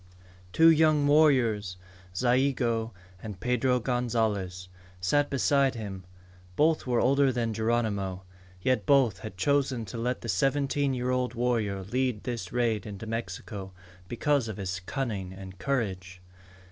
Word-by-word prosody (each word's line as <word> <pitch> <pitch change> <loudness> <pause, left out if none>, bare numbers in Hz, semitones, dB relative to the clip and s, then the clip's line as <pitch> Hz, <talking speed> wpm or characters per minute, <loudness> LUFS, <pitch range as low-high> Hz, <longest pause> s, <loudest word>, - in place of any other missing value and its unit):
Two 165 - +6
young 155 -2 +4
warriors, 125 -11 +3 0.4
Zayigo 120 -1 +1 0.3
and 105 -4 -7
Pedro 125 +2 +1
Gonzalez, 110 -7 -1 0.3
sat 145 +11 +1
beside 140 0 +2
him. 100 -5 -7 0.5
Both 155 - +2
were 120 -2 +2
older 135 +1 +3
than 115 -2 -1
Geronimo. 105 -4 -1 0.4
Yet 130 +7 0
both 130 -9 +4
had 95 -1 -8
chosen 135 0 +1
to 115 - -7
let 125 +2 -2
the - - -7
seventeen 135 +6 +1
year 125 0 -1
old 125 -1 -1
warrior 115 -5 0
lead 125 +1 -1
this 120 -3 -4
raid 115 -2 0
into 105 +1 -7
Mexico 110 -3 -5 0.3
because 130 +3 0
of 110 - -6
his 95 -2 -3
cunning 105 -9 -3
and 95 -1 -10
courage. 95 -9 -2
120 Hz, 135 wpm, -28 LUFS, 100-130 Hz, 0.5 s, Two